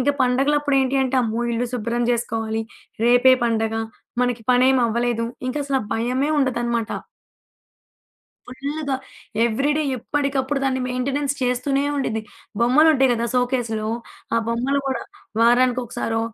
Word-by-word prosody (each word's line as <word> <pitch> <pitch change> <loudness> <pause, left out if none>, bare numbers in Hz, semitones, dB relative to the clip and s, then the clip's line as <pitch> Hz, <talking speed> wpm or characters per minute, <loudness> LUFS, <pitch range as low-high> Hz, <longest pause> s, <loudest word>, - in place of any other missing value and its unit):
ఇంక 255 - 0
పండుగలప్పుడు 275 +3 +2
ఏంటి 265 +1 +1
అంటే 265 0 0
అమ్మో! 230 +1 -1
ఇల్లు 240 +1 -1
శుభ్రం 235 +1 -1
జేసుకోవాలి, 225 -1 -1 0.4
రేపే 245 +2 +6
పండుగ 225 -1 0 0.5
మనకి 245 -2 -1
పనేమవ్వలేదు. 240 -2 +2 0.2
ఇంక 255 - -3
అసలు 270 -2 +1
భయమే 255 +6 0
ఉండదనమాట. 240 -4 0 1.7
ఫుల్లుగా, 285 -1 -2 0.5
ఎవ్రి 265 +6 +1
డే 310 - +1
ఎప్పటికప్పుడు 275 +2 -1
దాన్ని 260 -1 0
మెయింటైనెన్స్ 275 +3 -1
చేస్తూనే 255 +3 +1
ఉండిద్ది. 225 -5 -1 0.4
బొమ్మలుంటాయి 270 +1 +5
గదా 235 0 -1
సోకేస్‌లో, 240 -4 0 0.5
ఆ - - +3
బొమ్మలు 255 +4 0
కూడా 260 -3 -2 0.4
వారానికి 245 +2 +4
ఒకసారో, 225 -1 -2
250 Hz, 120 wpm, -22 LUFS, 235-270 Hz, 1.7 s, రేపే